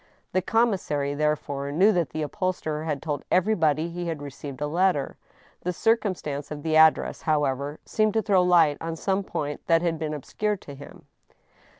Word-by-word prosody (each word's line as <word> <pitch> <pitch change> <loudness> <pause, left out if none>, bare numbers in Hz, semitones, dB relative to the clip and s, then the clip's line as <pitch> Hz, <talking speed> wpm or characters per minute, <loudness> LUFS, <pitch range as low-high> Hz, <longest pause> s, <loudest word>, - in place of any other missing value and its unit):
The 185 - +1
commissary, 185 -10 0
therefore, 145 -2 -1
knew 190 +8 +5
that 175 -6 0
the 155 - -3
upholsterer 155 -1 -2
had 150 -4 -3
told 150 -3 -3
everybody 165 -5 +2
he 175 0 -4
had 165 -3 -3
received 140 -1 -8
a 150 - -1
letter. 170 -2 +1 0.5
The 180 - -1
circumstance 180 -9 -1
of 145 -1 -7
the 160 -1 0
ad 160 0 +8
dress, - - -6
however, 145 -1 0
seemed 215 -1 +1
to 220 - +2
throw 195 -4 +4
light 170 -5 +4
on 165 0 -3
some 195 +4 -1
point 145 -5 -4
that 165 0 +4
had 165 -2 0
been 155 -1 -3
obscure 210 +8 -2
to 145 - -11
him. 140 +1 -13
160 Hz, 180 wpm, -25 LUFS, 145-185 Hz, 0.5 s, ad